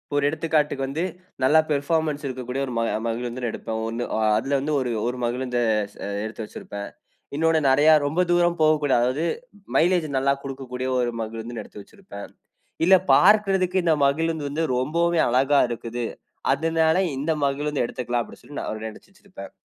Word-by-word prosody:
ஒரு 145 - +2
எடுத்துக்காட்டுக்கு 150 -3 0
வந்து, 155 +6 -2 0.4
நல்ல 150 +5 +5
பெர்ஃபார்மன்ஸ் 150 +1 0
இருக்கக்கூடிய 130 +1 -4
ஒரு 125 - -5
ம - - +1 0.3
மகிழ்ந்து 120 +1 -3
எடுப்பேன். 110 0 -5
ஒன்னு 115 +2 -3
ஆ - - 0 0.2
அதுல 135 +5 0
வந்து 150 +2 -2
ஒரு 125 -2 -2 0.2
ஒரு 125 +1 -2
மகிழுந்த 125 +1 -2 0.4
ச - - -20 0.3
எடுத்து 110 0 -6
வச்சிருப்பேன். 100 -1 -8 0.5
இன்னொன்னு 160 +1 +3
நிறைய 145 +4 +5 0.2
ரொம்ப 155 +6 +1
தூரம் 175 0 +3
போகக்கூடாது. 150 -4 +3
அதாவது, 130 +6 0 0.5
மைலேஜ் 175 -1 +3
நல்லா 140 +1 +2
குடுக்கக்கூடிய 130 -2 -5
ஒரு 120 -1 0
மகிழுந்து 115 +1 -5
எடுத்து 105 - -12
வச்சிருப்பேன். 185 - -11 0.5
இல்ல 190 +3 +7 0.2
பார்க்கறதுக்கு 195 -2 +4
இந்த 165 -2 +3
மகிழுந்து 160 +2 0
வந்து 155 +3 -2
ரொம்பவே 165 +6 +1
அழகா 135 +3 +3
இருக்குது. 120 +1 -4 0.5
அதுனால, 160 0 +2 0.2
இந்த 145 +5 -2
மகிழ்ந்து 145 0 0
எடுத்துக்குலாம் 120 0 -2
அப்டினு - - -13
சொல்லி 145 - -9
நான் 110 0 -5
நினச்சு 110 - -14
வச்சிருப்பேன். 190 - -12
140 Hz, 155 wpm, -24 LUFS, 125-160 Hz, 0.5 s, இல்ல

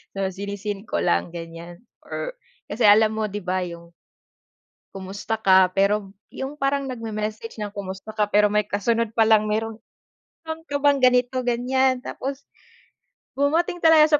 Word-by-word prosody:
So 195 -1 -1
si-ne-seen 200 +1 -5
ko 85 - 0
lang 85 - +1
ganyan 170 +2 -9 0.2
or - - -5 0.4
kasi 235 - 0
alam 215 +1 +6
mo 220 - 0
'di 205 +1 -5
ba 185 +1 0
yung 170 -1 -9 1.1
"Kumusta 195 +3 -4
ka?" 190 -3 +5
pero 200 0 +1 0.2
yung 270 +2 -5
parang 275 -1 0
nag-me-message 220 -2 -5
ng, 210 -1 -5
“Kumusta 195 +2 -7
ka?” 210 -1 0
pero 210 0 +5
may 210 +1 +1
kasunod 220 +2 0
pa 225 -1 +3
lang, 220 -1 +5
"Meron 225 +1 -1 0.7
meron 320 0 -6
ka 285 - -4
bang 285 -1 +4
ganito, 250 0 +3
ganyan?" 255 +1 +1
Tapos, 275 +1 -5 1.0
dumating 330 +5 +1
talaga 310 -2 +6
215 Hz, 150 wpm, -23 LUFS, 195-255 Hz, 1.1 s, alam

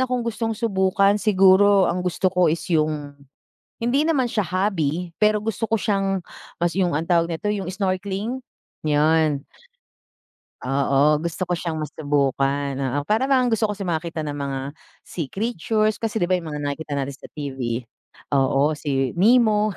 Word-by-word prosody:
akong 250 -2 0
gustong 225 -1 -2
subukan 200 -1 +2
siguro 195 -1 +5
ang 180 - -1
gusto 180 +1 -1
ko 180 -2 +3
is 165 - -2
yung, 155 -2 0 0.7
hindi 240 +5 +1
naman 310 -6 +2
siya 220 -2 0
hobby, 180 -3 -1
pero 210 0 +4
gusto 225 0 -3
ko 225 - +3
siyang 195 -1 0 0.4
mas 175 0 +1
yung 185 -3 +1
ang 165 - -3
tawag 170 -1 +2
nito, 165 +6 -3
yung 190 -3 -4
snorkeling? 195 +5 -2 0.4
'Yun. 150 -1 +2 1.2
Oo, 140 +3 +2
gusto 170 +3 -4
ko - - 0
siyang 160 -3 -3
masubukan, 140 -2 -1
oo 135 +1 -1
parang 220 - +1
bang 260 -2 +3
gusto 225 -1 +2
ko 210 - -3
kasi 200 - -7
makakita 165 -2 -2
ng 145 -1 -5
mga 140 -1 -3 0.4
sea 165 -5 -5
creatures 215 - -1
kasi 220 -3 -2
'di 175 - 0
ba 185 - +3
yung 165 -3 -7
mga 145 - -4
nakikita 145 +1 -4
natin 140 0 -3
sa - - -12
TV 140 -3 -6 0.7
oo 140 +1 +2
si 135 -3 -1
Nemo, 215 -1 +4
180 Hz, 160 wpm, -23 LUFS, 150-210 Hz, 1.2 s, siguro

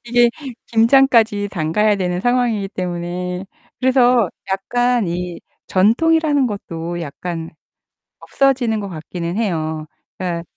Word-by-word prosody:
이게 240 0 +4 0.4
김장까지 230 -3 +4
담가야 200 +5 +1
되는 180 -1 -1
상황이기 240 -4 +1
때문에 180 0 -4 0.4
그래서 250 -5 +4 0.2
약간 245 +3 +1
이 175 0 -4 0.3
전통이라는 290 - +3
것도 175 -5 -5
약간 165 +1 -5 0.7
없어지는 250 -5 +1
것 200 - -5
같기는 170 +2 -5
해요. 160 -7 -2 0.3
그러니까 175 -2 -3
200 Hz, 265 characters per minute, -19 LUFS, 175-245 Hz, 0.7 s, 이게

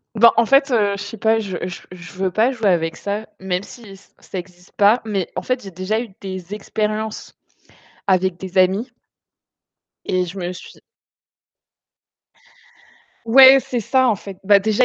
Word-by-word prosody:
Ben, 230 +2 +7
en 230 - +4
fait, 275 +3 +3
heu, 205 -4 +2
je - - -5
sais 205 +2 -8
pas, 220 +2 +2
je 195 -5 -4
je 180 - -7
je 180 +1 -11
veux 190 0 -2
pas 230 +7 +2
jouer 225 -5 0
avec 165 -2 0
ça, 205 +2 -4
même 185 0 -2
si 205 -1 -13
ç 190 - -23
ça 190 - -8
existe 180 0 -12
pas, 210 +4 +4
mais 195 -5 -2
en - - -2
fait, 255 0 -2
j'ai 195 - -9
déjà 190 +5 -2
eu 235 - -9
des 185 -1 -7
expériences 215 +1 -4 0.7
avec 185 -1 +1
des 185 +1 -2
amis 195 +7 +2 1.1
et 185 -1 0
je 185 +3 -8
me 180 0 -4
suis 180 - -13 2.4
Ouais, 265 +3 +8
c'est 245 0 -4
ça 260 +3 +2
en 215 - +2
fait. 190 0 -10
Bah, 200 +1 +5
déjà, 215 +4 +2
200 Hz, 175 wpm, -20 LUFS, 185-225 Hz, 2.4 s, Ouais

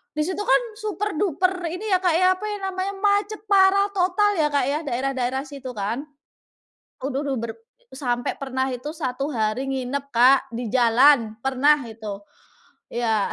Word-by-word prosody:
di 305 - 0
situ 375 +3 -3
kan - - +4 0.2
super 420 -1 -3
duper 370 0 0
ini 395 +5 -5
ya, 370 - +4
Kak 355 -3 +2
ya, 365 +1 +4
apa 425 - -6
ya 415 - -3
namanya, 375 +1 -2
macet 410 +1 +1
parah, 395 0 +5
total 385 +2 +2
ya 300 - +4
Kak 285 -3 +2
ya, 295 +2 0
daerah-daerah 265 +1 -1
situ, 270 -3 -8
kan? 225 +8 -3 1.0
Aduh 275 +1 -2
duh 270 -2 -1
ber 230 -1 -4 0.4
sampai 245 -3 -2
pernah 265 -1 -2
itu 250 +4 -5
1 270 -1 -3
hari 225 +3 -1
nginep 270 +1 -3
Kak, 260 +3 +5
di 240 -1 -3
jalan, 240 -1 +4
pernah 270 +3 +4
itu. 215 -3 -7 0.7
Iya. 225 -4 0
275 Hz, 160 wpm, -23 LUFS, 245-370 Hz, 1.0 s, parah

